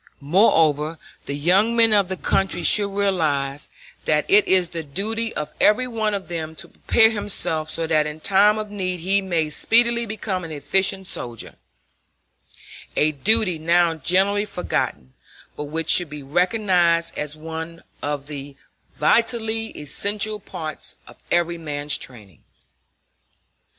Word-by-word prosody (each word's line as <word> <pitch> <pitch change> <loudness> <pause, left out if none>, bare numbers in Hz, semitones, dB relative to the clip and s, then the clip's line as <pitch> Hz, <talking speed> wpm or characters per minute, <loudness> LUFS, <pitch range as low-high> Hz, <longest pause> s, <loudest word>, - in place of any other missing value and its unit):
Moreover, 155 -1 +2 0.3
the 140 - -3
young 190 +10 +2
men 225 -1 +4
of 200 -3 +3
the 190 - -3
country 195 +1 0
should 205 -1 +3
realize 155 -9 -1 0.4
that - - +1
it 400 +2 +4
is 185 -2 +3
the 165 - -5
duty 220 +9 -2
of 150 - -4
every 235 +5 +4
one 220 -3 -1
of 195 - -6
them 160 -2 -5
to - - -7
prepare 220 -1 +3
himself 195 -7 0
so 165 +1 -2
that 155 -2 +1
in 150 +1 -7
time 200 +4 +4
of 215 -1 -5
need 185 -4 -3
he 195 +3 +2
may 165 -5 -1
speedily 235 +6 +3
become 200 -3 -4
an 165 - -7
efficient 190 +6 0
soldier 120 - -6 1.4
a 155 +1 +3
duty 185 +3 +2
now 170 +1 +3
generally 190 +7 +1
forgotten, 65 - -3 0.4
but 150 - -5
which 160 +2 0
should 175 -3 +4
be 150 -1 -8
recognized 175 +1 +1
as 150 +1 -4
one 160 +1 -7 0.2
of 145 -1 -3
the 145 -1 -8 0.4
vitally 225 +5 +1
essential 205 +8 -1
parts 160 -6 -5
of - - -15
every 170 0 +1
man's 145 -2 -2
training. 105 - -10
175 Hz, 140 wpm, -22 LUFS, 155-205 Hz, 1.4 s, men